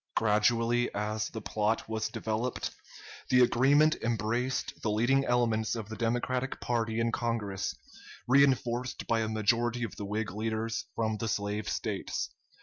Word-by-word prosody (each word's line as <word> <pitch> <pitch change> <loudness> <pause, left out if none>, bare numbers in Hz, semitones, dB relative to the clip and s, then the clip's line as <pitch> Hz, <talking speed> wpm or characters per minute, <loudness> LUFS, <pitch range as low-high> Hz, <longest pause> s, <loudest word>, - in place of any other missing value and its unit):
Gradually, 115 +3 +2
as 105 +1 -1
the 110 -2 -7
plot 110 +2 0
was 110 0 -1
developed, 115 +3 -2 0.6
the 125 0 +6
agreement 140 +6 +5
embraced 115 +3 -1
the 110 - 0
leading 120 +6 +3
elements 115 -3 +1
of 110 -2 -5
the 110 - -5
Democratic 120 +3 -1
party 115 -2 -1
in 115 0 +1
Congress, 115 -5 -2 0.5
reenforced 125 -2 +2
by 115 - +1
a 110 - 0
majority 115 +3 +1
of 115 - -4
the 100 - -4
Whig 105 0 -2
leaders 110 +2 -2
from 110 -1 0
the 115 - -3
slave 105 0 -2
States. - - -3
115 Hz, 145 wpm, -30 LUFS, 110-120 Hz, 0.6 s, the